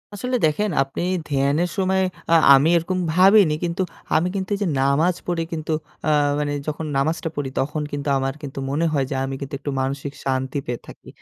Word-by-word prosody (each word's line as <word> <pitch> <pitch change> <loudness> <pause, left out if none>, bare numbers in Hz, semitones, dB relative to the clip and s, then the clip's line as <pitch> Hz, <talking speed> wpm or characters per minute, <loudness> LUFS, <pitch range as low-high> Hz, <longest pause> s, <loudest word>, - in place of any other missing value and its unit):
আসলে 250 +5 -2
দেখেন 205 +8 +1
আপনি 135 0 -6 0.3
ধ্যানের 145 +4 +1
সময় 190 0 +2 0.3
আ - - +6 0.2
আমি 140 +4 +5
এরকম 185 +3 -1
ভাবিনি 185 -2 +6
কিন্তু 175 +2 -1 0.3
আমি 160 +3 +3
কিন্তু 190 -1 -3
এইযে 200 -2 -1
নামাজ 155 +6 +2
পড়ি 170 -2 0
কিন্তু 155 0 -4 0.3
আ 155 - +1 0.3
মানে 145 -1 -1 0.2
যখন 155 +1 -3
নামাজটা 160 +4 0
পড়ি 145 -2 -2
তখন 150 +3 -1
কিন্তু 145 0 -4
আমার 135 0 -1
কিন্তু 135 -2 -6
মনে 150 +4 0
হয় 140 -2 +2
যে, 135 - -2
আমি 135 0 -3
কিন্তু 140 +1 -6
একটু 145 0 -4
মানসিক 140 +1 -3
শান্তি 130 +1 -1
পেয়ে 120 -1 -3
থাকি। - - -13
150 Hz, 185 wpm, -22 LUFS, 140-175 Hz, 0.3 s, আ